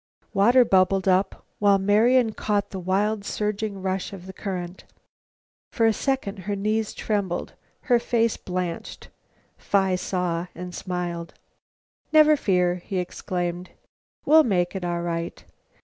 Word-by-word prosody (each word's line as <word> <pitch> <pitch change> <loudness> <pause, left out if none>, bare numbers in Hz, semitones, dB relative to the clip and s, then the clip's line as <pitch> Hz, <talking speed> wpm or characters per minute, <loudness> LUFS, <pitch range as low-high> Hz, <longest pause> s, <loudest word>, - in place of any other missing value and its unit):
Water 240 +5 +5
bubbled 190 -1 +3
up, 190 +1 +1
while 200 -1 +5
Marian 220 +4 +3
caught 205 -2 -1
the 190 - -5
wild 200 +3 0
surging 210 -1 -3
rush 190 +1 -2
of 185 -2 -9
the 190 - -9
current. 180 -2 -5 0.9
For 230 - +1
a 225 - +4
second 260 -5 -2
her 205 - 0
knees 215 +2 -1
trembled, 200 -5 -2 0.3
her 245 -4 +3
face 230 -1 +1
blanched. 180 -2 -5 0.5
Phi 190 -2 +1
saw 180 -1 -2
and 180 0 -7
smiled. 175 -2 -4 0.8
"Never 310 -1 +6
fear," 180 -8 +1
he 185 +2 -5
exclaimed; 180 0 -3 0.6
"we'll 315 +1 +7
make 180 -6 0
it 190 - -4
all 175 -1 -2
right. 170 - -4
195 Hz, 135 wpm, -24 LUFS, 180-215 Hz, 0.9 s, we'll